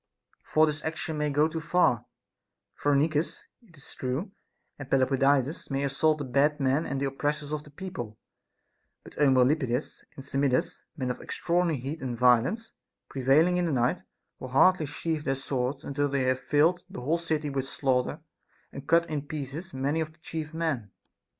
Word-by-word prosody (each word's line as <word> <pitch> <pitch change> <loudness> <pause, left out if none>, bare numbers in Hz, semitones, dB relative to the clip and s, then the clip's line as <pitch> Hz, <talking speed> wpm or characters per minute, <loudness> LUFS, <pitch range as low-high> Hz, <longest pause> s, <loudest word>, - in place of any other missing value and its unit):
For 155 0 +4
this 150 -1 -3
action 160 -1 -3
may 150 0 +1
go 145 +2 +3
too 160 0 -4
far, 160 -8 +2 0.7
Phcrenicus, 150 +2 +1 0.2
it 180 -10 -21
is 140 - -7
true, 135 +10 -3 0.5
and 140 -2 -8
Pelopidas 135 +2 +2
may 135 0 -1
assault 150 +3 +2
the 145 - -4
bad 140 +4 +2
men 135 +3 +1
and 140 - -2
the 140 - 0
op 135 0 -4
pressors 150 0 -1
of 150 - -2
the 150 - -14
people; 140 - -7 0.9
but - - -13
Eumolpidas 130 -1 +2
and 135 - -10
Samidas, 135 -2 0 0.2
men 130 -3 -1
of 125 - -7
extraordinary 170 -4 0
heat 140 +6 -5
and 125 -3 -3
violence, 125 - +3 0.4
prevailing 145 +7 +3
in 180 - +1
the - - -1
night, 130 +7 +1 0.4
will - - -6
hardly 155 +5 +4
sheathe 155 +1 -3
their 135 -2 0
swords 135 0 -2
until 145 +1 -1
they 140 -1 0
have 130 0 +1
filled 165 +5 +2
the - - -7
whole 155 +7 +1
city 155 -3 -2
with 135 -1 -2
slaughter 130 -2 0 0.5
and 140 +1 -9
cut 170 +1 +4
in 150 -3 -4
pieces 150 +4 -5
many 140 +4 -1
of 155 0 -4
the 160 - -29
chief 155 -1 -5
men. 160 -10 -2
145 Hz, 175 wpm, -28 LUFS, 135-160 Hz, 0.9 s, For